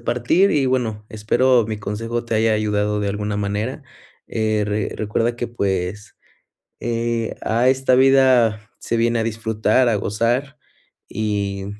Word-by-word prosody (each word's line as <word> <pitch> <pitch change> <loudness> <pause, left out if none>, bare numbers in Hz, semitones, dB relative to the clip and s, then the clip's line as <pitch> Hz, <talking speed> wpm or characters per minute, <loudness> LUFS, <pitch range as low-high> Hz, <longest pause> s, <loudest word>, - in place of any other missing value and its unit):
partir 125 +12 +2
y 140 -3 +2
bueno, 110 -5 -1
espero 120 +3 +2
mi 110 -1 -3
consejo 115 +4 -4
te 115 - -3
haya 110 0 +2
ayudado 105 0 0
de 100 -1 -1
alguna 105 +1 -3
manera, 105 +8 -3 0.4
eh, 110 -1 0
re 105 0 -2
recuerda 115 +3 -1
que 120 - -3
pues, 100 -2 -3 0.6
eh, 115 -1 -2
a 120 +3 +2
esta 130 -1 +2
vida 130 -5 +4
se 115 - -2
viene 115 0 +1
a - - +1
disfrutar, 110 +2 +1
a 115 - +2
gozar 120 +8 -1 0.5
y 100 -2 -3
110 Hz, 140 wpm, -20 LUFS, 105-120 Hz, 0.6 s, vida